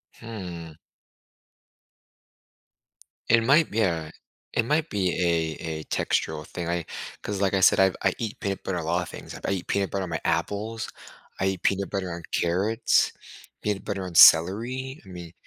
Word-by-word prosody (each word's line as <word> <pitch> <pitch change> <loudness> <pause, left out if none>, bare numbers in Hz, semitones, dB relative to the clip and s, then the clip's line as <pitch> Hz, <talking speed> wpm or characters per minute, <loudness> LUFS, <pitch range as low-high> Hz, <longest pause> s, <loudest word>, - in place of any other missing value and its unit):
Hmm. 90 -8 -8 2.6
It 115 -1 +5
might 145 +6 +4
be 110 +2 0
a 80 -5 0 0.4
it 115 - +2
might 150 +5 0
be 95 -3 0
a 80 -2 -1
a - - -10
textural 75 -1 -1
thing, 85 -1 -5
I 85 -2 -1 0.4
'cause 100 -1 -4
like 95 0 +2
I 95 - +3
said, - - +6
I’ve 95 -1 +4
I 95 - +2
eat 110 -2 -5
peanut 100 -1 -3
butter 90 -2 -2
on 80 - -3
a - - -6
lot 85 +1 +1
of - - -6
things- - - -9
I - - 0
eat 95 -3 -3
peanut 100 -1 0
butter 95 -1 -1
on - - -8
my 80 - -3
apples, 110 +2 -1 0.5
I 95 - +2
eat 95 -2 -2
peanut 100 0 +1
butter 95 -2 -3
on 85 0 -7 0.2
carrots, 100 +7 +2 0.5
peanut 105 -2 -2
butter 100 -2 -3
on 90 -2 -8
celery- 120 - +5
I - - -14
mean 85 -2 -9
95 Hz, 180 wpm, -26 LUFS, 85-105 Hz, 2.6 s, said